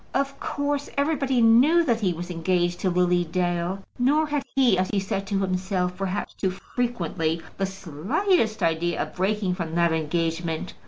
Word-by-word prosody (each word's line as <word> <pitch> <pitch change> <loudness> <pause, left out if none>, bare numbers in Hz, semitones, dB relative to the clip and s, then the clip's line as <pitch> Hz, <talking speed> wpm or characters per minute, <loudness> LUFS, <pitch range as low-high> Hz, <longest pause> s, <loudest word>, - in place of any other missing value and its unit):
Of 275 0 -1
course, 285 0 -2
everybody 280 -4 +1
knew 265 +10 +6
that 235 -7 +1
he 190 -3 +2
was 175 +1 -5
engaged 175 +1 0
to 190 - +1
Lily 180 0 +2
Dale; 175 +2 -1 0.2
nor 290 +5 +3
had 295 -1 -1
he, 255 -7 +4
as 185 0 0
he 205 - 0
said 195 0 -3
to 195 -1 0
himself, 185 -1 -1
perhaps 195 +1 -3
too 190 - -1
frequently, 180 -6 -2 0.2
the 195 - +1
slightest 200 - 0
idea 165 +1 0
of - - -9
breaking 195 0 0
from 170 -3 -4
that 170 -1 +3
engagement. 165 +1 -2
190 Hz, 165 wpm, -25 LUFS, 175-240 Hz, 0.2 s, knew